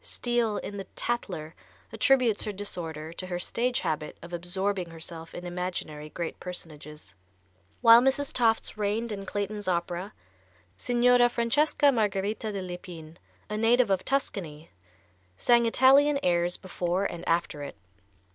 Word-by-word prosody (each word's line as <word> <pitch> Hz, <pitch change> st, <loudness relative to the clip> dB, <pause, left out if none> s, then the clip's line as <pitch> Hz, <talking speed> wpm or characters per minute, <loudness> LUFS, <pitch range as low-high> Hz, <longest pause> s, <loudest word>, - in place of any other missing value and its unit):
Steele, 240 Hz, -3 st, -1 dB
in 205 Hz, -, -6 dB
the 195 Hz, -, -5 dB
"Tattler," 180 Hz, -10 st, -2 dB, 0.4 s
attributes 255 Hz, -6 st, +3 dB
her 210 Hz, -, -2 dB
disorder 165 Hz, -6 st, -5 dB
to 185 Hz, +2 st, -4 dB
her 180 Hz, -1 st, -3 dB
stage 240 Hz, +7 st, -1 dB
habit 150 Hz, -1 st, -3 dB
of 170 Hz, +1 st, -10 dB
absorbing 180 Hz, +1 st, -2 dB
herself 165 Hz, 0 st, -8 dB
in 175 Hz, -, -7 dB
imaginary 175 Hz, -4 st, -4 dB
great 170 Hz, +1 st, -5 dB
personages. 150 Hz, -, -8 dB, 0.7 s
While 230 Hz, -1 st, +9 dB
Mrs. 270 Hz, +2 st, +1 dB
Tofts 225 Hz, -3 st, +1 dB
reigned 215 Hz, +3 st, -1 dB
in 195 Hz, -2 st, -6 dB
Clayton's 205 Hz, +1 st, -3 dB
opera, 175 Hz, +2 st, -2 dB, 0.6 s
Signora 245 Hz, -, +4 dB
Francesca 280 Hz, +5 st, +2 dB
Margarita 210 Hz, -1 st, -1 dB
de 195 Hz, -2 st, -4 dB
l'Epine, 175 Hz, -3 st, -9 dB, 0.3 s
a 210 Hz, -, -3 dB
native 230 Hz, 0 st, +3 dB
of 190 Hz, -1 st, +1 dB
Tuscany, 170 Hz, -, -2 dB, 0.7 s
sang 235 Hz, -, +4 dB
Italian 275 Hz, +5 st, +5 dB
airs 175 Hz, 0 st, +1 dB
before 180 Hz, +1 st, -2 dB
and 175 Hz, -, -4 dB
after 165 Hz, -3 st, 0 dB
it. 140 Hz, -, -7 dB
195 Hz, 135 wpm, -28 LUFS, 170-235 Hz, 0.7 s, While